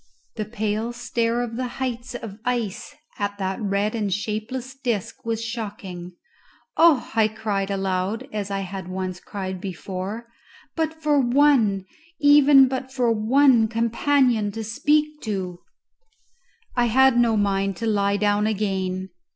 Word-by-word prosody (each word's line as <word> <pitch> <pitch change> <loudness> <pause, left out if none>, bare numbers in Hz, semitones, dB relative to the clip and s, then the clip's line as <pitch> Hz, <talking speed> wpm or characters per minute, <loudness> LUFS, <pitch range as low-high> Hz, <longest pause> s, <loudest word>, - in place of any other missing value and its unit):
The 215 - -3
pale 220 +1 -2
stare 235 0 -1
of 230 -1 -5
the 255 0 -2
heights 250 -1 -4
of 215 -3 -7
ice 245 +1 -3 0.2
at 205 0 -2
that 190 +1 -3
red 200 +1 0
and 210 -4 -1
shapeless 220 +6 -3
disc 240 -8 -3
was 230 0 -2
shocking. 200 -6 -6 0.6
"Oh," 320 -6 +4
I 220 -1 +4
cried 210 -3 -2
aloud, 195 +4 -2
as 205 -2 -3
I 195 0 -2
had 190 -1 -6
once 185 -1 -4
cried 190 -2 -6
before, 190 +4 -5 0.5
"but 320 0 -2
for 295 -2 +3
one, 240 -7 +3 0.3
even 290 -2 +7
but 260 0 -4
for 250 -3 +1
one, 235 +1 +4
companion 235 0 +1
to 225 - -4
speak 300 +7 +1
to!" 185 -5 -4 1.2
I 245 -1 +3
had 265 +2 +4
no 230 -2 +3
mind 195 -2 0
to 230 - -3
lie 200 -2 +1
down 205 +1 +2
again. 190 -3 -2
220 Hz, 140 wpm, -23 LUFS, 200-250 Hz, 1.2 s, even